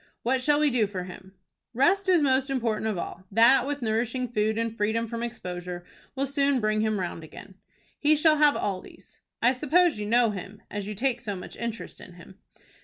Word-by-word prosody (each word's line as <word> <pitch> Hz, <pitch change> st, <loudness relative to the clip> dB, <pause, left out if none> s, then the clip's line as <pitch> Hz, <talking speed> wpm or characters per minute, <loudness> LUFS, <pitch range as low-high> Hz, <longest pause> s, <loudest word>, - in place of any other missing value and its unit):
"What 255 Hz, +2 st, +1 dB
shall 290 Hz, +2 st, +3 dB
we 300 Hz, -2 st, +3 dB
do 230 Hz, -4 st, +2 dB
for 190 Hz, -3 st, -5 dB
him?" 185 Hz, +1 st, -11 dB, 0.4 s
"Rest 380 Hz, -, +3 dB
is 350 Hz, -4 st, +4 dB
most 265 Hz, 0 st, +2 dB
important 230 Hz, -5 st, -1 dB
of 215 Hz, -4 st, -1 dB
all. 185 Hz, +2 st, -6 dB
That, 235 Hz, +5 st, +5 dB
with 285 Hz, -2 st, -3 dB
nourishing 235 Hz, +3 st, -1 dB
food 215 Hz, -1 st, 0 dB
and 230 Hz, 0 st, -2 dB
freedom 220 Hz, +2 st, 0 dB
from 230 Hz, 0 st, -5 dB
exposure, 180 Hz, -6 st, -6 dB, 0.3 s
will 275 Hz, +1 st, 0 dB
soon 280 Hz, -1 st, +1 dB
bring 215 Hz, -1 st, +1 dB
him 215 Hz, -2 st, 0 dB
round 175 Hz, -2 st, -4 dB
again." 190 Hz, +5 st, -12 dB, 0.5 s
"He 300 Hz, +1 st, +4 dB
shall 305 Hz, 0 st, +4 dB
have 295 Hz, -1 st, +5 dB
all 190 Hz, -2 st, -2 dB
these." -, -, -16 dB, 0.2 s
"I 245 Hz, +2 st, +5 dB
suppose 310 Hz, +1 st, +2 dB
you 210 Hz, -, -3 dB
know 235 Hz, 0 st, +3 dB
him, 205 Hz, +2 st, -8 dB
as 205 Hz, -1 st, -4 dB
you 210 Hz, -, -5 dB
take 255 Hz, +3 st, -1 dB
so 205 Hz, -2 st, -4 dB
much 180 Hz, -, -9 dB
interest 235 Hz, -1 st, -6 dB
in 180 Hz, -, -12 dB
him?" 180 Hz, +3 st, -15 dB
230 Hz, 205 wpm, -26 LUFS, 205-270 Hz, 0.5 s, That